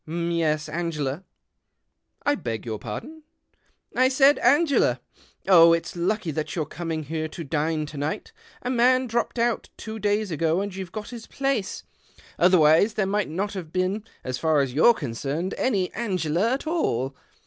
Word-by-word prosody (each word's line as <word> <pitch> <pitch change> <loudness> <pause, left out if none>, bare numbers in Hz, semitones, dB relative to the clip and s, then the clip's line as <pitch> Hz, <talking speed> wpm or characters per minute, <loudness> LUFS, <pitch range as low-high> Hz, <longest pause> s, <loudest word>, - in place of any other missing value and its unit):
M'yes, 165 -2 -1
Angela. 150 -1 -3 0.3
' - - -54
" - - -39
I 290 - +4
beg 115 - -4
your 110 -2 -4
pardon? 285 - -7 0.2
" - - -42
" - - -30
I - - +4
said 275 +2 +5
Angela. 275 - +3 0.5
Oh, 170 -3 +8
it's 165 +1 -2
lucky 175 +1 -1
that 155 +1 -4
you're 160 -3 -1
C(jming 165 -2 -4
here 155 +2 -3
to 165 +2 -7
dine 155 +1 -1
to 150 0 -9
night! 145 +2 -3 0.3
A 250 - -1
man 255 +1 +4
dropped 235 +1 -2
out 235 -1 0
two 220 0 -7
days 205 -1 0
ago, 160 +2 +1
and 200 0 -3
you've 190 -2 -6
got 210 +2 -6
his 235 -2 -9
place. 270 -8 -2 0.6
Otherwise 175 +3 +5
there 205 - +1
might 205 +1 0
not 195 +6 -2
have 175 -5 -7
been, 185 +4 -1 0.2
as 130 0 -4
far 155 -3 +3
as 135 -3 -2
you're 230 - +6
concerned, 140 - -3
any 195 -8 0
Angela 190 -2 0
at 270 +4 -2
all. 135 - -1
175 Hz, 175 wpm, -25 LUFS, 155-220 Hz, 0.6 s, Oh